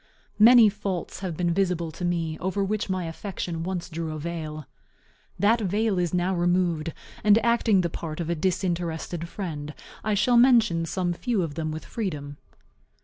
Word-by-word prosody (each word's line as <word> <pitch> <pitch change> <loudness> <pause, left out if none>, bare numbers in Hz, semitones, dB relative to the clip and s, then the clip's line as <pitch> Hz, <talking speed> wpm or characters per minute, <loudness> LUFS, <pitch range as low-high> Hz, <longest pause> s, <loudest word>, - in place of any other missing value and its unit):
Many 230 +1 +8
faults 200 -4 -3
have 180 -5 -4
been 175 -1 +1
visible 175 -3 0
to 170 - -8
me, 170 -2 -1
over 190 +2 -1
which 210 +1 -2
my 185 -2 -1
affection 165 0 -5
once 180 0 -3
drew 165 -2 -4
a - - -5
veil. 155 -2 -5 0.7
That 225 +3 +3
veil 205 0 +1
is 175 -2 0
now 180 +1 +1
removed; 175 -2 +1 0.3
and 210 0 +6
acting 230 -4 +3
the 170 - -1
part 155 -1 -6
of 170 - -2
a 170 - 0
disinterested 170 -1 -2
friend, 150 -7 -5 0.3
I 215 -1 +1
shall 240 +4 +3
mention 225 -10 +4
some 175 0 -1
few 220 +1 -1
of 160 -3 -4
them 160 0 -3
with 155 +1 -6
freedom. 150 -10 -4
175 Hz, 170 wpm, -26 LUFS, 165-200 Hz, 0.7 s, Many